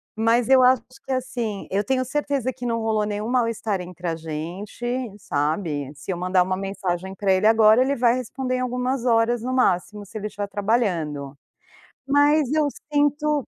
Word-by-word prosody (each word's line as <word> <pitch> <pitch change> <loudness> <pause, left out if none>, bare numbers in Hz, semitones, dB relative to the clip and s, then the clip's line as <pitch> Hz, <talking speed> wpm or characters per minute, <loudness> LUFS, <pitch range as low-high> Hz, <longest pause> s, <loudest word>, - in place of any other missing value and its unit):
mas 230 +1 +2
eu 265 -1 +6
acho 255 -1 +5 0.2
que 270 - -5
assim, 240 -5 -3
eu 200 +2 0
tenho 255 +4 0
certeza 275 -2 -1
que 250 0 -8
não 230 -1 0
rolou 220 -1 0
nenhum 210 +1 -3
mal-estar 230 -5 0
entre 180 0 -7
a 165 - -1
gente, 165 +8 -6 0.3
sabe. 150 -3 -2
Se 145 +6 -6
eu 175 - -3
mandar 185 +1 +2
uma 185 +1 0
mensagem 190 -1 -3
para 195 0 +1
ele, 185 +2 +1
agora 220 +1 +6
ele 275 +2 +2
vai 240 0 +3
responder 255 +1 -3
em - - -1
algumas 250 0 -1
horas, 230 0 +2
no 255 - -2
máximo, 205 -3 +1
se 215 +3 -9
ele 210 - -3
estiver 205 -1 -5
trabalhando, 180 - -1 0.7
mas 290 0 +3
eu 310 -1 +3 0.2
sinto 295 0 +1
220 Hz, 175 wpm, -23 LUFS, 190-255 Hz, 0.7 s, eu